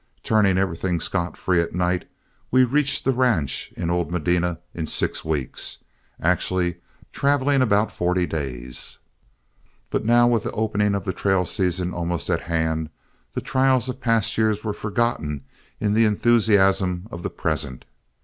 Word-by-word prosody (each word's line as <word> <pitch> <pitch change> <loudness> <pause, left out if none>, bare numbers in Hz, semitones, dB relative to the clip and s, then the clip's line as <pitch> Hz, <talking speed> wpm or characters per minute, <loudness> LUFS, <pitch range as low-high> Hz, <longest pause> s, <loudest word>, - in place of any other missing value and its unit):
Turning 100 -4 +3
everything 90 -2 0
scot 85 +1 -2
free 90 -2 +2
at 85 - -4
night, 90 0 0 0.4
we 130 +1 +5
reached 140 +2 +1
the 135 - +3
ranch 120 - 0
in 85 -1 -1
old 85 -3 0
Medina 90 0 0 0.2
in 80 -2 -4
six - - -1
weeks, 75 -5 -2 0.4
actually 90 0 0 0.4
traveling 140 -1 +2
about 105 -3 +2
forty 90 0 0
days. 65 -6 -5 0.9
But - - 0
now, 120 +2 +5
with 120 -2 +3
the - - -4
opening 105 -2 +1
of 100 - -3
the 95 - -1
trail 95 0 +1
season 90 -1 -1
almost 85 -1 -2
at - - +1
hand, 80 -1 -1 0.4
the - - -2
trials 130 -1 +2
of 130 - -5
past 115 -3 +1
years 110 -1 +1
were 105 -2 -2
forgotten 105 - -1 0.4
in 105 -1 +1
the 115 +1 +4
enthusiasm 100 -4 +3
of 85 - -6
the - - -3
present. 75 -5 -3
95 Hz, 150 wpm, -23 LUFS, 85-110 Hz, 0.9 s, we